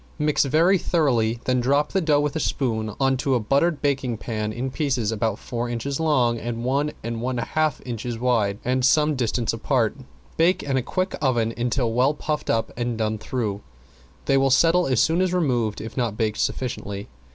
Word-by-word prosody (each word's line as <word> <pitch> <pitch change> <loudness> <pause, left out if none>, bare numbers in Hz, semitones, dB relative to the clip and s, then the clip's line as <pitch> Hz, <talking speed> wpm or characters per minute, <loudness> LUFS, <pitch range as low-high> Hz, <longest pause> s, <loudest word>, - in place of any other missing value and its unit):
Mix 150 -2 +2
very 165 +7 +3
thoroughly, 120 -11 +1
then 125 0 +2
drop 140 +4 +1
the 190 - +1
dough 150 -3 +3
with 150 +1 -2
a - - 0
spoon 110 -7 -1
on 135 -1 +2
to 130 +1 +1
a - - +2
buttered 140 +9 +1
baking 135 -5 0
pan 110 -1 -3
in 125 +4 -4
pieces 130 -7 0
about 110 -1 -1
four 120 -1 -4
inches 125 +4 -3
long 130 -7 +2
and 120 0 -4
one 140 +3 0
and 115 0 -4
one 125 +1 -2
half 155 +4 0
inches 120 -1 -4
wide 115 -5 +1
and 125 +1 +1
some 150 +3 +4
distance 120 -2 0
apart. 115 0 0 0.4
Bake 170 +3 +3
in 140 -2 -1
a 130 - +2
quick 185 +9 -2
oven 120 -5 +1
until 120 -1 -1
well 130 +5 +2
puffed 150 0 -3
up 115 0 0
and 120 -1 -2
done 110 -1 -1
through; 105 -4 -3 0.6
they 135 - +3
will 135 0 +3
settle 165 +6 +4
as 130 -4 +2
soon 165 +3 +3
as 185 -1 +1
removed 120 -11 0
if 110 - -7
not 115 -5 -1
baked 110 -2 -1
sufficiently. 100 -5 -3
125 Hz, 195 wpm, -23 LUFS, 115-145 Hz, 0.6 s, some